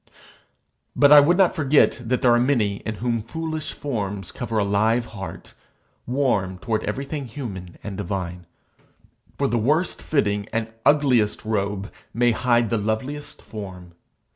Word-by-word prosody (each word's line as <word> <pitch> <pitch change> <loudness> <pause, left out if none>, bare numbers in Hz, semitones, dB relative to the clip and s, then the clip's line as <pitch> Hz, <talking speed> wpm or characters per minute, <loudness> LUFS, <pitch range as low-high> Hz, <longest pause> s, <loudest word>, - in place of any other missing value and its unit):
But 145 0 +5
I 150 - +11
would 165 +5 +4
not 190 -3 +4
forget 145 -5 +3
that 125 +2 -1
there 120 -2 +6
are 120 - +4
many 120 -6 +1
in 110 +1 -5
whom 115 +1 -1
foolish 155 +6 -4
forms 100 - -4
cover 115 -2 -4
a 105 - +3
live 110 +4 +2
heart, 95 -6 -9 0.5
warm 120 -8 0
toward 110 +3 -2
everything 140 +6 -3
human 105 -9 -7
and 100 -2 -6
divine; 90 -3 -4 0.9
for 140 - +1
the 120 -2 0
worst 155 +10 +1
fitting 105 -8 0
and 115 -1 -2
ugliest 130 -9 +3
robe 100 -2 -2 0.2
may 120 +1 +4
hide 120 -1 +2
the 115 - +1
loveliest 130 +8 -4
form. 95 -5 -9
115 Hz, 145 wpm, -23 LUFS, 100-140 Hz, 0.9 s, I